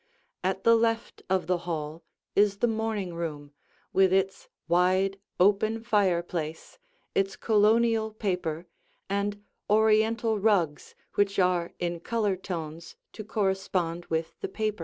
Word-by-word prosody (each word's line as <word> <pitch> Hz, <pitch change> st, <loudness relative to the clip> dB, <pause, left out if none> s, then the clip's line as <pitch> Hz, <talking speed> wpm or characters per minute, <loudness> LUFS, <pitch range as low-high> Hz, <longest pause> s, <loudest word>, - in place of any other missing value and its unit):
At 190 Hz, +1 st, -1 dB
the 230 Hz, 0 st, +6 dB
left 225 Hz, 0 st, 0 dB
of 190 Hz, -1 st, +1 dB
the 180 Hz, -1 st, +1 dB
hall 160 Hz, -2 st, -4 dB, 0.3 s
is 200 Hz, -1 st, +4 dB
the 220 Hz, -, +2 dB
morning 220 Hz, -5 st, -2 dB
room 150 Hz, -4 st, -5 dB, 0.4 s
with 190 Hz, -1 st, +4 dB
its 190 Hz, 0 st, 0 dB, 0.2 s
wide, 185 Hz, +3 st, +2 dB, 0.2 s
open 210 Hz, +4 st, +3 dB
fireplace, 175 Hz, -, -1 dB, 0.3 s
its 195 Hz, 0 st, +1 dB
Colonial 220 Hz, +1 st, +3 dB
paper, 180 Hz, -6 st, -2 dB, 0.5 s
and 205 Hz, +1 st, -1 dB, 0.3 s
Oriental 220 Hz, +1 st, +3 dB
rugs 190 Hz, -8 st, +1 dB, 0.2 s
which 205 Hz, 0 st, +1 dB
are 180 Hz, -2 st, +2 dB
in 175 Hz, -1 st, -2 dB
color 210 Hz, +1 st, 0 dB
tones 165 Hz, -3 st, -6 dB, 0.2 s
to 215 Hz, -, -7 dB
correspond 190 Hz, -5 st, -1 dB
with 160 Hz, 0 st, -2 dB
the 395 Hz, -, -3 dB
paper. 215 Hz, -, -2 dB
195 Hz, 125 wpm, -28 LUFS, 175-215 Hz, 0.5 s, the